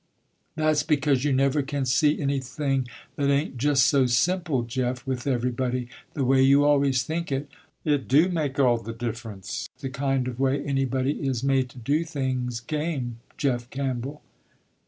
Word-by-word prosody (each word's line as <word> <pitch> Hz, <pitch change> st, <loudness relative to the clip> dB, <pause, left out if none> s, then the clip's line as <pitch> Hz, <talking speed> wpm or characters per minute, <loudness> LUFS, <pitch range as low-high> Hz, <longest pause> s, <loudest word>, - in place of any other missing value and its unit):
"That's 155 Hz, -1 st, +2 dB
because 145 Hz, -3 st, +1 dB
you 145 Hz, -, +1 dB
never 135 Hz, +2 st, +2 dB
can 140 Hz, -1 st, -2 dB
see 145 Hz, +4 st, +3 dB
anything 135 Hz, -1 st, -1 dB, 0.3 s
that 140 Hz, -1 st, +1 dB
ain't 140 Hz, -1 st, 0 dB
just 135 Hz, 0 st, +3 dB
so 135 Hz, +1 st, +4 dB
simple, 160 Hz, +1 st, +1 dB
Jeff, 125 Hz, +2 st, -2 dB
with 130 Hz, -1 st, -3 dB
everybody, 125 Hz, -1 st, -1 dB, 0.3 s
the 140 Hz, -4 st, 0 dB
way 130 Hz, +1 st, +4 dB
you 140 Hz, +2 st, +5 dB
always 140 Hz, -3 st, +3 dB
think 165 Hz, +3 st, -3 dB
it. 135 Hz, +2 st, -1 dB, 0.4 s
It 145 Hz, -4 st, +1 dB
do 150 Hz, +7 st, +5 dB
make 155 Hz, -7 st, -2 dB
all 125 Hz, -4 st, +4 dB
the 115 Hz, 0 st, -7 dB
difference 110 Hz, -, -5 dB
the 135 Hz, -1 st, -5 dB
kind 135 Hz, -1 st, 0 dB
of 125 Hz, -1 st, -5 dB
way 135 Hz, +1 st, +1 dB
anybody 135 Hz, 0 st, 0 dB
is 130 Hz, -2 st, -1 dB
made 135 Hz, -2 st, +2 dB
to 125 Hz, -, -16 dB
do 140 Hz, +7 st, 0 dB
things 130 Hz, -6 st, -2 dB
game 145 Hz, -5 st, -3 dB, 0.2 s
Jeff 125 Hz, -4 st, -1 dB
Campbell." 135 Hz, +1 st, -4 dB
135 Hz, 160 wpm, -25 LUFS, 125-145 Hz, 0.4 s, you